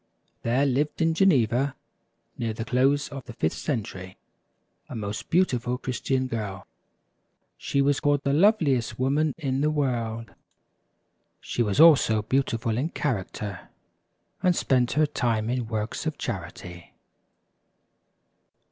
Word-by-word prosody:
HERE 125 +4 +2
lived 140 +3 0
in 165 -1 +2
Geneva, 135 - +2 0.6
near 115 -2 -2
the 115 +1 -5
close 135 +4 +2
of 135 -2 -7
the 120 - -9
fifth 80 -7 -1
century, 95 -8 -4 0.7
a - - -7
most 105 -1 -5
beautiful 125 -9 +1
Christian 130 +1 -1
girl. 105 -6 -5 0.9
She 140 - 0
was 140 0 +2
called 145 -1 +1
the 140 - +1
loveliest 155 - +3
woman 145 +4 +1
in 135 -4 -1
the 150 - +2
world. 115 -7 -2 1.1
She - - -3
was 105 -1 0
also 140 -10 +6
beautiful 115 -2 0
in 150 +5 -1
character, 105 - -4 0.7
and 180 -1 +3
spent 125 -5 +1
her 155 +1 +3
time 115 -6 -1
in 125 -2 -2
works 110 0 -3
of - - -3
charity. 85 0 -7
130 Hz, 125 wpm, -26 LUFS, 115-145 Hz, 1.1 s, also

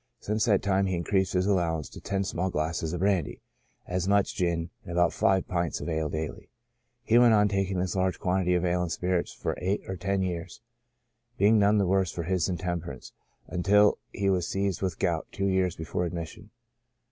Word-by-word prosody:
Since 105 +1 -1
that 105 -5 +2
time 95 -1 +2
he 95 - 0
increased 95 +2 0
his 90 0 +2
allowance 85 -6 0
to - - -11
ten 100 0 -1
small 95 0 -2
glasses 80 0 -2
of 90 0 -3
brandy, 95 -6 0 0.5
as 90 0 -2
much 100 0 +2
gin, 85 -1 -1
and - - -9
about 85 -1 +3
five 95 -1 +2
pints 85 -2 -1
of - - -6
ale 80 -2 -1
daily. 80 0 -5 0.5
He 115 +2 +4
went 120 -2 +6
on 105 0 +4
taking 95 -1 -1
this 90 +1 -1
large 95 -1 0
quantity 90 -2 +1
of 90 0 +1
ale 90 0 +1
and 90 -2 -2
spirits 90 +2 -1
for - - -3
eight 95 +3 0
or 95 - -3
ten 95 +1 -1
years, 85 -1 -4 0.8
being 105 +3 +5
none 105 +1 +4
the 100 - +3
worse 95 -1 +1
for 85 - -4
his 90 +1 0
intemperance, 85 -5 -4 0.3
until 100 +4 +3
he 100 - -2
was 90 -3 +1
seized 100 -2 -1
with 95 -4 -2
gout 85 -2 -1
two 100 - -2
years 95 -2 +1
before 80 +2 -3
admission. 85 +4 -7
90 Hz, 195 wpm, -28 LUFS, 85-100 Hz, 0.8 s, went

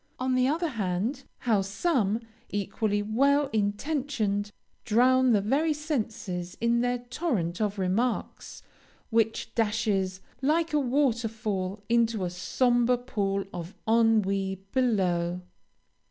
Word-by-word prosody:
On 255 0 0
the 255 0 +3
other 325 +4 0
hand, 220 +4 -2 0.2
how 220 -5 +2
some, 215 - 0 0.3
equally 205 +1 -1
well 275 +6 +2
intentioned, 210 -1 -1 0.3
drown 255 +3 +4
the 210 -3 +4
very 290 +10 +1
senses 215 - -3
in 235 +1 +2
their 245 0 +1
torrent 240 - -2
of 205 -1 0
remarks, 200 +6 -2 0.5
which 225 -1 +1
dashes, 210 -4 0 0.2
like 315 +4 +1
a 300 - +4
water 250 -3 +1
fall, 205 -3 -3
into 230 -4 +2
a 175 - -3
sombre 245 +6 +2
pool 200 -6 -2
of 175 +3 -7
ennui 200 -4 +2
below! 180 -8 +1
225 Hz, 115 wpm, -28 LUFS, 195-255 Hz, 0.5 s, drown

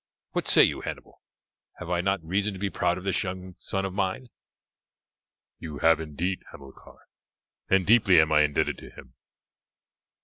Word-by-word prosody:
What - - -2
say - - +6
you, - - +1
Hannibal, - - -8 0.6
have 90 -1 -7
I 85 -1 +1
not 95 -1 -1
reason 100 +5 -1
to 95 - -9
be 100 0 -2
proud 90 - 0
of 90 - -8
this 95 -2 0
young 95 0 -6
son 95 0 -3
of 95 - -5
mine?" 100 +6 -2 1.3
"You 75 -3 -7
have 80 0 +4
indeed, 80 +4 -3
Hamilcar, 70 -1 -15 0.6
and 95 -1 +3
deeply 100 -5 +5
am 80 0 +3
I 75 0 +5
indebted 75 -1 0
to - - -12
him. 65 - -15
90 Hz, 165 wpm, -26 LUFS, 80-95 Hz, 1.3 s, say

